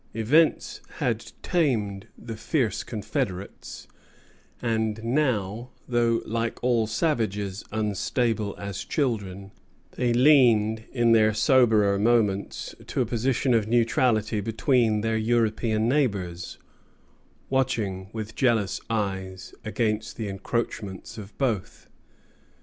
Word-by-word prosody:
Events 145 Hz, +9 st, +2 dB, 0.2 s
had -, -, -2 dB
tamed 110 Hz, -, 0 dB
the 115 Hz, -1 st, -7 dB
fierce 115 Hz, -, -1 dB
confederates; 100 Hz, -3 st, -5 dB, 0.7 s
and 110 Hz, -2 st, -1 dB
now, 120 Hz, -4 st, 0 dB, 0.2 s
though, 120 Hz, -2 st, +1 dB
like 115 Hz, +1 st, -2 dB
all 120 Hz, -3 st, +2 dB
savages, 105 Hz, -, -1 dB
unstable 110 Hz, 0 st, -1 dB
as 100 Hz, -1 st, -5 dB
children, 100 Hz, -, -2 dB, 0.4 s
they 125 Hz, -1 st, 0 dB
leaned 120 Hz, -5 st, +4 dB
in 120 Hz, -2 st, +2 dB
their 110 Hz, -2 st, +4 dB
soberer 110 Hz, -4 st, +4 dB
moments 105 Hz, -3 st, +1 dB
to -, -, -1 dB
a -, -, +2 dB
position 125 Hz, +3 st, 0 dB
of 110 Hz, -2 st, +2 dB
neutrality 115 Hz, -2 st, +2 dB
between 115 Hz, 0 st, +1 dB
their 115 Hz, 0 st, 0 dB
European 110 Hz, -1 st, +1 dB
neighbors, 100 Hz, -, -1 dB, 0.9 s
watching 110 Hz, -8 st, -1 dB
with 110 Hz, -1 st, -6 dB
jealous 115 Hz, -7 st, +1 dB
eyes 95 Hz, -4 st, -3 dB
against 110 Hz, -1 st, -2 dB
the 110 Hz, -, -3 dB
encroachments 100 Hz, 0 st, -4 dB
of 105 Hz, 0 st, -11 dB
both. 115 Hz, -9 st, -2 dB
110 Hz, 105 wpm, -26 LUFS, 105-120 Hz, 0.9 s, leaned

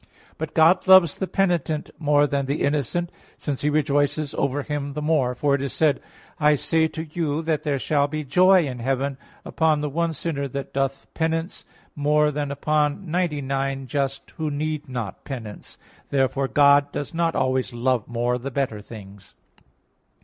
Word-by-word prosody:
But 160 Hz, -1 st, -5 dB
God 165 Hz, +4 st, +4 dB
loves 190 Hz, -5 st, +6 dB
the 190 Hz, -, -1 dB
penitent 170 Hz, -6 st, 0 dB
more 145 Hz, -2 st, +3 dB
than 140 Hz, -2 st, -1 dB
the 140 Hz, +2 st, -1 dB
innocent; 150 Hz, +4 st, -1 dB, 0.3 s
since 140 Hz, -3 st, -3 dB
He 150 Hz, -, +1 dB
rejoices 145 Hz, 0 st, +1 dB
over 140 Hz, +1 st, -1 dB
him 145 Hz, -1 st, -4 dB
the 150 Hz, -, -4 dB
more. 145 Hz, -5 st, +1 dB
For 140 Hz, +3 st, +1 dB
it 140 Hz, -, +1 dB
is 140 Hz, -2 st, -3 dB
said: 150 Hz, -3 st, +2 dB, 0.4 s
"I 150 Hz, -1 st, +5 dB
say 160 Hz, +3 st, +1 dB
to 160 Hz, 0 st, -6 dB
you 155 Hz, -1 st, -2 dB
that 160 Hz, -2 st, 0 dB
there 145 Hz, -2 st, -1 dB
shall 145 Hz, +1 st, +1 dB
be 155 Hz, +1 st, -4 dB
joy 180 Hz, +5 st, +5 dB
in 125 Hz, -3 st, -5 dB
heaven 135 Hz, +2 st, -1 dB, 0.3 s
upon 155 Hz, -2 st, +1 dB
the 150 Hz, -, -2 dB
one 165 Hz, +2 st, 0 dB
sinner 140 Hz, -2 st, -3 dB
that 140 Hz, +1 st, -6 dB
doth 135 Hz, 0 st, -1 dB
penance, 165 Hz, +2 st, -2 dB, 0.3 s
more 150 Hz, +1 st, +2 dB
than 145 Hz, -1 st, -3 dB
upon 150 Hz, +4 st, -1 dB
ninety 170 Hz, -4 st, 0 dB
nine 135 Hz, 0 st, -2 dB
just 135 Hz, +1 st, -3 dB
who 155 Hz, -1 st, -1 dB
need 150 Hz, 0 st, -3 dB
not 120 Hz, -7 st, -5 dB
penance" 115 Hz, -7 st, -8 dB
(Luke -, -, -28 dB
15:7). -, -, -39 dB
Therefore 135 Hz, 0 st, +1 dB
God 145 Hz, 0 st, +4 dB
does 145 Hz, -, -5 dB
not 165 Hz, 0 st, 0 dB
always 130 Hz, 0 st, 0 dB
love 120 Hz, -1 st, 0 dB
more 120 Hz, +1 st, -1 dB
the 135 Hz, +3 st, -5 dB
better 130 Hz, -6 st, -2 dB
things. 100 Hz, -2 st, -12 dB
145 Hz, 180 wpm, -23 LUFS, 135-155 Hz, 0.4 s, loves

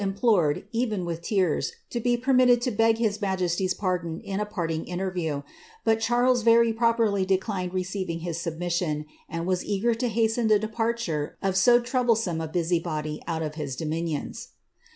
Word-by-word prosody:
fill 195 Hz, -1 st, -1 dB
nplored, 195 Hz, -9 st, +2 dB
even 225 Hz, -6 st, -1 dB
with 170 Hz, -1 st, -4 dB
tears, 185 Hz, -3 st, 0 dB, 0.2 s
to 240 Hz, -, -2 dB
be 240 Hz, +1 st, +1 dB
permitted 250 Hz, -1 st, +4 dB
to 245 Hz, +1 st, -1 dB
beg 225 Hz, +1 st, +3 dB
his 220 Hz, -2 st, 0 dB
majesty's 185 Hz, -1 st, 0 dB
ill 180 Hz, +2 st, -2 dB
a -, -, 0 dB
parting 165 Hz, -6 st, -2 dB
interview; 175 Hz, -5 st, -3 dB, 0.4 s
but 225 Hz, 0 st, +3 dB
Charles 245 Hz, +2 st, +2 dB
very 230 Hz, 0 st, +5 dB
properly 225 Hz, -3 st, +2 dB
declined 190 Hz, -1 st, -1 dB
re 185 Hz, 0 st, -1 dB
hit 175 Hz, -3 st, -4 dB
submission, 165 Hz, -2 st, -2 dB, 0.2 s
and 165 Hz, 0 st, -3 dB
was 185 Hz, -1 st, 0 dB
eager 210 Hz, +4 st, +1 dB
to 240 Hz, +2 st, -1 dB
hasten 225 Hz, 0 st, +1 dB
the 215 Hz, -1 st, +5 dB
departure 220 Hz, -7 st, -2 dB
of 195 Hz, -1 st, 0 dB
so 240 Hz, +5 st, +5 dB
ome 225 Hz, -9 st, +1 dB
a 160 Hz, -, -3 dB
busybody 160 Hz, -2 st, -2 dB
out 160 Hz, -1 st, -2 dB
of 155 Hz, -1 st, -4 dB
his 145 Hz, -4 st, -4 dB
dominions.' 160 Hz, 0 st, -3 dB
190 Hz, 160 wpm, -26 LUFS, 170-225 Hz, 0.4 s, very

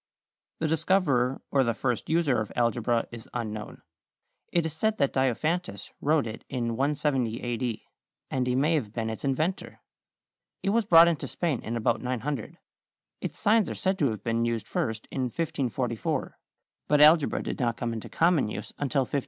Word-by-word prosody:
= -, -, -62 dB
The 160 Hz, -, +2 dB
discoverer 150 Hz, -6 st, +1 dB
or 135 Hz, -1 st, +4 dB
the 115 Hz, -2 st, 0 dB
first 120 Hz, -2 st, -2 dB
user 155 Hz, -8 st, +2 dB
of 105 Hz, -, -5 dB
algebra 120 Hz, 0 st, +1 dB
is 115 Hz, -1 st, -10 dB
unknown. 110 Hz, -3 st, -5 dB, 0.7 s
It 170 Hz, -2 st, +2 dB
is 160 Hz, -, -3 dB
said 215 Hz, +7 st, 0 dB
that 140 Hz, -, +1 dB
Diophantus 130 Hz, -, -1 dB
wrote 150 Hz, -1 st, +2 dB
it 110 Hz, 0 st, -7 dB
in 120 Hz, -3 st, -2 dB
170 135 Hz, -3 st, 0 dB
A. 120 Hz, -1 st, -2 dB
D., 115 Hz, -1 st, -3 dB, 0.5 s
and 130 Hz, -1 st, 0 dB
he 125 Hz, -, +1 dB
may 145 Hz, +5 st, +3 dB
have 115 Hz, -10 st, -1 dB
been 115 Hz, -1 st, -2 dB
its 110 Hz, -, -7 dB
inventor. 155 Hz, +7 st, -1 dB, 0.8 s
It 195 Hz, -, +1 dB
was 230 Hz, 0 st, +2 dB
brought 170 Hz, -3 st, +8 dB
into 170 Hz, -3 st, 0 dB
Spain 160 Hz, -8 st, -1 dB
in 115 Hz, +1 st, -3 dB
about 115 Hz, +1 st, +1 dB
900. 130 Hz, 0 st, -3 dB, 0.6 s
Its -, -, -5 dB
signs 215 Hz, 0 st, +3 dB
are -, -, -4 dB
said 190 Hz, 0 st, 0 dB
to 140 Hz, -, +3 dB
have 105 Hz, -3 st, -5 dB
been 115 Hz, 0 st, 0 dB
used 115 Hz, -2 st, -1 dB
first 110 Hz, -1 st, -2 dB
in 130 Hz, -2 st, -1 dB
1544, 130 Hz, -3 st, -2 dB, 0.5 s
but 150 Hz, -, +3 dB
algebra 155 Hz, 0 st, +5 dB
did -, -, -4 dB
not 120 Hz, -3 st, 0 dB
come 120 Hz, -1 st, -2 dB
into 110 Hz, -, -6 dB
common 165 Hz, -7 st, +3 dB
use 105 Hz, -, -6 dB
until 145 Hz, -1 st, +1 dB
1590. 140 Hz, +2 st, -1 dB
130 Hz, 180 wpm, -27 LUFS, 115-155 Hz, 0.8 s, brought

